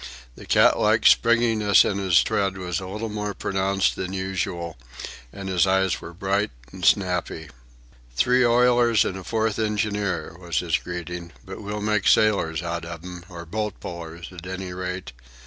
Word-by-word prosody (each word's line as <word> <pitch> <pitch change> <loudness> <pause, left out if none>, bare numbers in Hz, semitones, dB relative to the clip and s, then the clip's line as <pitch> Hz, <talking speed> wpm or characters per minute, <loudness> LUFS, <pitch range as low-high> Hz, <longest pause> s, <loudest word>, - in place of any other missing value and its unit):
The - - -13
cat - - +4
like - - +2
springiness 115 -3 +5
in 100 - -1
his 95 -4 +4
tread 95 -1 -1
was 90 -1 -3
a 95 - -7
little 105 +4 -4
more 105 -1 -4
pronounced 95 0 0
than 95 0 -4
usual, 95 -3 -3 0.6
and 100 -1 -8
his 95 -1 +2
eyes 95 -1 +1
were - - -8
bright 100 +3 -1 0.2
and 95 - -10
snappy. 90 -5 +1 0.7
"Three 125 - +3
oilers 120 -1 +4
and 95 - -2
a 95 - -7
fourth 110 +1 -1
engineer," 105 -6 -1
was 85 -4 -4
his - - +1
greeting. 85 0 -6
"But 95 +3 -8
we'll 105 0 -5
make 105 -2 +1
sailors 90 -6 +3
out 85 0 -3
of 85 -1 -8
them, 90 -1 -9
or 85 -2 -9
boat 105 +5 -4
pullers 85 -1 -8
at 90 -1 -9
any 95 -1 -5
rate. 90 0 -5
95 Hz, 165 wpm, -24 LUFS, 90-105 Hz, 0.7 s, springiness